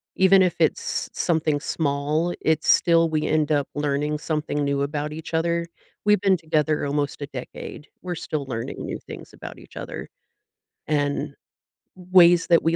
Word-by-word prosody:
even 190 0 +6
if 180 -2 +2
it's 160 - 0
something 155 -3 +1
small, 150 +3 -1
it's 160 0 +1
still 165 -1 +5
we 155 -1 0
end 155 -1 +1
up 145 -2 +1
learning 145 +1 -1
something 150 -1 -2
new 140 0 0
about 145 +1 -2
each 160 +1 -8
other. 170 +1 0 0.4
We've 210 -1 +4
been 195 -2 +4
together 155 -1 0
almost 145 0 -2
a 145 - -4
decade. 135 +2 -8
We're 180 -1 -4
still 155 -3 -4
learning 115 -3 -4
new - - -4
things - - -10
about - - -10
each - - -15
other. - - -7 0.8
And 145 -1 -1 0.6
ways 180 -2 +5
that 170 -1 +4
we 165 +1 +2
155 Hz, 160 wpm, -24 LUFS, 145-170 Hz, 0.8 s, even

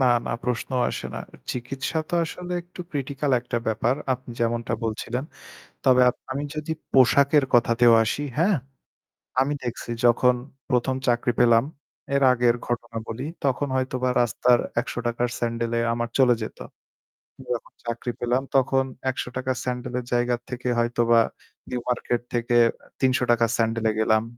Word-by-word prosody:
না, 130 - +4 0.2
না - - -1
প্রশ্নও 125 +1 -1
আসে - - -4
না। - - -4 0.3
চিকিৎসা 130 +5 -3
তো - - -2
আসলে 180 +2 -6
একটু 175 +1 -12
ক্রিটিক্যাল 140 0 -2
একটা 120 -1 -2
ব্যাপার। 110 +3 +1 0.2
আপনি 125 0 -12
যেমনটা 115 0 0
বলছিলেন। 120 +3 -3 0.6
তবে 130 -1 +6 0.3
আমি 140 +2 -2
যদি 155 +1 -4 0.2
পোশাকের 140 +2 +5
কথাতেও 120 0 +5
আসি 140 +6 -2
হ্যাঁ, 185 +5 +3 0.9
আমি 140 +2 +1
দেখছি 120 0 -5
যখন 125 +1 +5 0.4
১ম 125 +1 +1
চাকরি 120 0 +2
পেলাম 115 0 +5 0.5
এর 140 - +2
আগের 120 -1 +3
ঘটনা 120 -1 -3
বলি। 125 +5 -4 0.2
তখন 140 +1 +1
হয়তো 130 0 -1
বা 130 - +3
রাস্তার 120 +1 +3 0.2
৳১০০ 120 -1 -3
'র - - -6
স্যান্ডেলে 115 0 -1
আমার 120 0 -2
চলে 125 -2 +6
যেত। 110 - -6 1.0
যখন 120 - -6
চাকরি 120 +1 -3
পেলাম 120 +2 +1
তখন 135 0 +3 0.3
৳১০০ 130 0 -3
'র 125 - -6
স্যান্ডেলের 125 0 -3
জায়গা 120 0 +2
থেকে 125 0 -5
হয়তোবা 120 0 +3 0.5
নিউ 125 - -2
মার্কেট 120 -1 0
থেকে 120 0 +1 0.4
৳৩০০'র 120 -3 +3
স্যান্ডেলে 115 -1 +1
গেলাম। 110 0 +3
125 Hz, 145 wpm, -24 LUFS, 120-130 Hz, 1.0 s, তবে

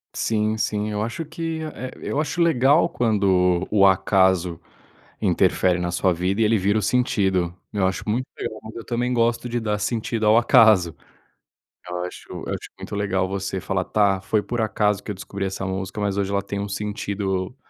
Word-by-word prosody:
Sim, 110 -1 0
sim. 105 0 -1
Eu 105 0 -2
acho 115 +9 -3
que 160 +1 -4
a 155 - -4 0.2
eh, - - -9
eu 145 - -2
acho 155 +3 -4
legal 155 -1 +4
quando 95 - +2
o 105 -2 +4
acaso 95 -2 +2 0.6
interfere 90 -1 +2
na 90 0 -1
sua 90 +1 +1
vida 90 +4 -1
e - - +4
ele 110 +1 +3
vira 100 +2 +1
o - - +1
sentido. 95 -6 +1 0.2
Eu 100 -3 +2
acho 95 - -3
muito 120 +5 -1
legal, 110 - -5
mas 110 - -10
eu 115 - -8
também 120 +1 -1
gosto 120 0 +1
de 120 0 -1
dar 105 -2 -1
sentido 110 +1 -1
ao 110 +1 +6
acaso. 110 -7 +5 0.9
Eu 90 0 -4
acho, 90 - -8
eu - - -7
acho - - -5
muito - - -6
legal 95 -2 0
você 95 0 -3
falar: 95 +1 -1
"Tá, 100 -3 +2
foi 105 +2 0
por 120 +3 -4
acaso 105 -2 +1
que 105 - -5
eu - - -5
descobri 100 +1 -5
essa 95 0 -4
música, 95 +2 -4
mas 100 -1 -1
hoje 100 -1 -1
ela 100 0 +1
tem 100 0 -5
um 100 - -3
sentido 100 0 -3
100 Hz, 195 wpm, -23 LUFS, 95-115 Hz, 0.9 s, ao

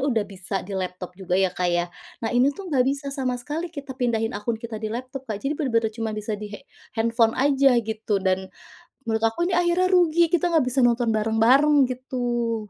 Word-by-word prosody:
udah 220 -3 +1
bisa 195 -1 -8
di 200 - -8
laptop 180 0 -5
juga, 180 -1 -2
ya, 190 -1 +2
Kak, 180 -1 -1
ya? 175 0 +1 0.4
Nah, - - 0
ini 250 +3 +4
tuh 375 -1 -8
nggak 255 -3 +4
bisa 280 +1 -1
sama 260 -3 -1
sekali 295 +7 -4
kita 285 -4 -8
pindahin 225 -3 0
akun 215 +3 -2
kita 225 -1 -7
di 220 - -3
laptop, 255 +2 -6
Kak. 215 - -2
Jadi 275 - 0
bener-bener 230 -6 +1
cuma 225 0 -3
bisa 215 +1 -4
di 210 0 -4
he - - -9 0.4
handphone 230 0 +2
aja, 275 -1 +4
gitu. 220 -1 -2
Dan, 190 0 0 0.6
menurut 225 0 -1
aku 225 +10 -4
nih 355 0 0
akhirnya 350 +1 +2
rugi, 345 -2 +4
kita 350 0 +2
nggak 320 -5 +3
bisa 255 +2 0
nonton 235 -1 +1
bareng-bareng, 235 +7 +4
gitu. 245 -2 -2
235 Hz, 205 wpm, -24 LUFS, 220-275 Hz, 0.6 s, ini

